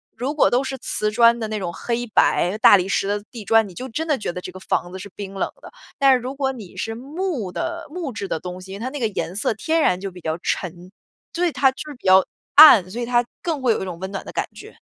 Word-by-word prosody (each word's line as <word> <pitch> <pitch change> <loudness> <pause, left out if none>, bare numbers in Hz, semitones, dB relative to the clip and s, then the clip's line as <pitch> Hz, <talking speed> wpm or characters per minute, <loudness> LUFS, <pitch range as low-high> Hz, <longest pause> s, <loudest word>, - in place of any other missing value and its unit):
如 275 +5 -3
果 - - +4
都 250 +2 +2
是 265 0 -4
瓷 215 -4 -1
砖 235 +2 +4
的 220 - -3
那 215 - -3
种 175 -3 -4
黑 240 +4 -3
白 200 -3 +2
大 205 - +8
理 185 0 -2
石 195 - 0
的 205 0 -2
地 230 -4 -8
砖， 225 0 +3
你 185 - -12
就 255 +7 -7
真 315 +7 -3
的 300 - +2
觉 205 - -3
得 180 - -6
这 185 - -7
个 185 - -11
房 175 -1 -2
子 190 - -7
是 200 - -9
冰 195 -1 -7
冷 195 - -2
的。 - - -12 0.3
但 275 -2 +5
是 255 - +3
如 260 +3 -5
果 270 -1 0
你 220 -9 -11
是 225 - -3
木 275 - -4
的 335 - -4
木 320 -4 -5
质 205 -1 -5
的 160 - -2
东 180 +1 -7
西， 190 +1 -9
它 235 +5 -4
那 290 +1 -6
个 230 - +1
颜 190 -3 -4
色 215 - 0
天 320 +8 0
然 180 -8 +2
就 195 -1 -5
比 180 - -13
较 160 0 -2
沉 180 0 -4 0.4
对， 350 0 0
它 270 -2 +3
就 300 +3 -9
是 295 - -8
比 - - -22
较 190 0 +7 0.3
暗， 230 - +9
所 240 - -5
以 235 - -2
它 240 0 +2 0.2
更 320 -6 -2
会 245 - +4
有 - - 0
一 - - -3
种 175 -2 -6
温 190 +1 -5
暖 195 - -5
的 - - -8
感 - - -2
觉。 - - -13
225 Hz, 300 characters per minute, -22 LUFS, 190-265 Hz, 0.4 s, 暗